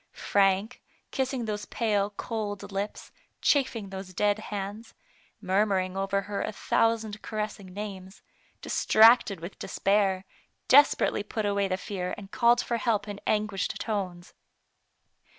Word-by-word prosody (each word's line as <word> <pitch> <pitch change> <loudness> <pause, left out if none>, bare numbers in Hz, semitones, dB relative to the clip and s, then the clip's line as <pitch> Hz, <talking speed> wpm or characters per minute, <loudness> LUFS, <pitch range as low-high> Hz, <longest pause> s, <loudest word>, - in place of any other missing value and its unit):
Frank, 200 +3 +1 0.3
kiss 265 -1 -1
ing 250 -4 -3
those 210 -1 -3
pale, 205 -3 0
cold 205 -1 -5
lips, 200 +2 -4 0.3
chafing 250 -8 +1
those 190 -1 -8
dead 205 +1 +2
hands, 210 +1 -6 0.4
murmuring 190 -1 +1
over 195 0 0
her 200 0 -4
a - - -2
thousand 220 0 0
caressing 210 -3 -5
names, 190 -1 -8 0.4
distracted 220 -3 +5
with 170 +4 -8
despair, 195 -1 +1 0.4
desperately 285 -5 +5
put 210 +1 -3
away 200 -1 +1
the 185 -1 -1
fear, 185 -1 -4
and 195 -1 -11
called 240 -1 +4
for 235 - -2
help 215 -3 0
in 205 -1 -6
anguished 210 -2 -1
tones. 185 -5 -4
205 Hz, 130 wpm, -28 LUFS, 195-220 Hz, 0.4 s, distracted